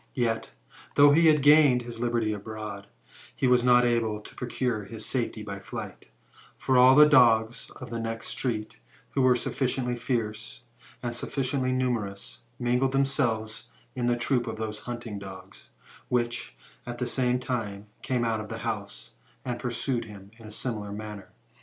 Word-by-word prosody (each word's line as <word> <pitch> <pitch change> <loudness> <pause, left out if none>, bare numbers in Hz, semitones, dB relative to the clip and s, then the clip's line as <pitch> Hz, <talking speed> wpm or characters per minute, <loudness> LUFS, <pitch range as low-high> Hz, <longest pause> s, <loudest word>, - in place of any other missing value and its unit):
Yet, 115 -3 0 0.5
though 145 0 +8
he 165 +3 +5
had 150 -3 +5
gained 145 -4 +6
his 120 -1 -8
liberty 115 -2 0
abroad, 105 -1 -7 0.5
he - - -1
was 125 -1 +4
not 125 0 +5
able 115 -3 +1
to 105 - -13
procure 120 -3 -2
his 110 +1 -7
safety 115 -4 -2
by 100 -1 -6
flight; 95 - -8 0.5
for 130 - 0
all 130 +1 +8
the 150 +1 +9
dogs 120 -5 +4
of 125 -2 -9
the 115 - -3
next 115 0 -4
street, 110 - -3 0.3
who 135 - 0
were 130 -1 +5
sufficiently 125 0 -1
fierce, 115 -3 -3 0.4
and 120 -1 -2
sufficiently 130 +1 -1
numerous, 100 - -2 0.2
mingled 125 +2 +1
themselves 115 -5 0 0.3
in 120 -1 -1
troops 120 0 0
with 110 - -4
those 110 -1 -4
hunting 120 -4 -5
dogs, 95 0 -11 0.4
which, 120 -1 -1 0.3
at 120 0 -5
the 125 - -2
same 125 0 +1
time, 110 -6 -4 0.2
came 125 -2 0
out 110 -1 0
of 110 - -7
the 115 - -5
house, 105 -3 -5 0.3
and 120 -1 -3
pursued 120 0 -2
him 100 -2 -12
in 110 - -11
a - - -10
similar 105 -3 -4
man 105 0 -6
ner. 100 - -14
120 Hz, 165 wpm, -27 LUFS, 110-125 Hz, 0.5 s, the